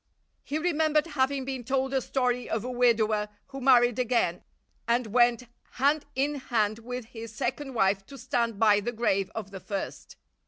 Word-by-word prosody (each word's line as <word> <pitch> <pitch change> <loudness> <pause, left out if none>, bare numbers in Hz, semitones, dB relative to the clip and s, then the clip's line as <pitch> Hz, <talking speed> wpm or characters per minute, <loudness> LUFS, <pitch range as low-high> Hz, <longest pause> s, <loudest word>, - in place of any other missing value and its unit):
He 295 - -3
remembered 310 -2 +2
having 275 -3 0
been 265 -2 -4
told 265 +2 -1
a 265 - +2
story 250 -1 -1
of 220 -1 -1
a 250 - -4
widower 220 -4 +2 0.2
who 270 0 -7
married 245 -2 +5
again 235 -8 +1 0.4
and 240 +1 +2
went 240 +2 +3 0.3
hand 285 +3 +1
in 285 +2 0
hand 215 -2 +1
with 250 +1 -6
his 230 -1 -9
second 265 +3 -3
wife 195 -2 +2
to 275 - -11
stand 235 -4 -1
by 210 -1 +5
the 240 +4 -3
grave 195 -4 0
of 210 -3 -5
the 195 - -7
first. 195 +1 -6
245 Hz, 170 wpm, -28 LUFS, 220-265 Hz, 0.4 s, married